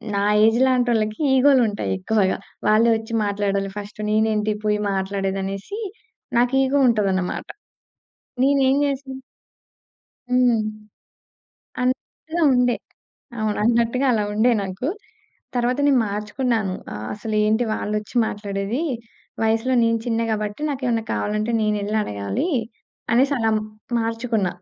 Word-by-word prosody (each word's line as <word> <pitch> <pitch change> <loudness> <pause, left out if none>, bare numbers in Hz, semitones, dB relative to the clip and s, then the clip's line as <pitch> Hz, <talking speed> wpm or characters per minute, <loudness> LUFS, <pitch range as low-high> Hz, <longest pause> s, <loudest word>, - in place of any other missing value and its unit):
నా 200 - +1 0.2
ఏజ్ 225 +2 +3
లాంటోళ్ళకి 240 -3 +1 0.2
ఈగో‌లుంటాయి 255 -6 +3
ఎక్కువగా. 195 0 +1 0.3
వాళ్ళే 220 +2 +5
వచ్చి 225 +1 -8
మాట్లాడాలి 200 -1 -1
ఫస్ట్. 205 +1 -8
నేనేంటి 215 0 +2
పోయి 210 0 +2
మాట్లాడేదనేసి 195 - -3 0.6
నాకు 245 +2 +3
ఇగో 275 +2 +2
ఉంటదన్నమాట. 195 -5 0 1.0
నేనేం 275 -1 +3
జేశా 275 -1 -3 1.2
హ్మ్. 250 -3 +3 1.2
అనట్టు‌గా 315 +6 -2
ఉండే. 250 -1 +3 0.6
అవును. 215 -1 -1
అన్నట్టుగా 235 +3 +2
అలా 215 -3 +1
ఉండే 230 +4 +3
నాకు. 190 +8 -4 0.7
తరువాత 245 +2 +1
నేను 270 -3 +4
మార్చుకున్నాను. 210 0 -1 0.2
ఆహ్, 105 +1 -6
అసలేంటి 215 +2 +1
వాళ్లొచ్చి 210 +3 -3
మాట్లాడేది? 205 +5 -3 0.6
వయసులో 225 +4 +1
నేను 230 0 +2
చిన్న 230 -1 0
గాబట్టి 210 +4 -3
నాకేమన్నా 245 -4 -1
కావాలంటే 215 +2 -1
నేనెళ్లడగాలి 210 - -1 0.6
అనేసలా 250 -3 +3 0.5
మార్చుకున్న. 225 -3 -1
220 Hz, 100 wpm, -22 LUFS, 205-250 Hz, 1.2 s, వాళ్ళే